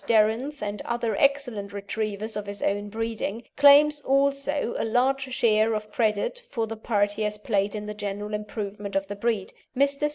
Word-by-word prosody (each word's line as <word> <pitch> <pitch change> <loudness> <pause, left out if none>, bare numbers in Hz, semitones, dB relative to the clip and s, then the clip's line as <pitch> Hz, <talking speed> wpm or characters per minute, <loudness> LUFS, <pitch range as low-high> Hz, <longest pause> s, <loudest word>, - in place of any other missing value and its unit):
Darenth 230 +6 +2
and 205 0 -3
other 235 -2 -1
excellent 250 -8 +1
Retrievers 210 +1 -3
of 210 -1 -4
his 200 0 -5
own 205 +1 0
breeding, 225 0 -3
claims 290 +1 +7
also 275 0 +1
a - - 0
large 260 +3 +1
share 220 -2 +3
of 215 0 -5
credit 220 - 0
for 230 -4 -1
the 225 0 -6
part 205 -2 +1
he 210 - -6
has 210 0 -1
played 205 -1 0
in 210 0 -4
the 210 - -5
general 205 0 -5
improvement 205 -1 -5
of 195 0 +1
the 205 +1 -6
breed. 210 -2 -1 0.2
Mr. 280 +2 +2
220 Hz, 175 wpm, -26 LUFS, 205-260 Hz, 0.2 s, claims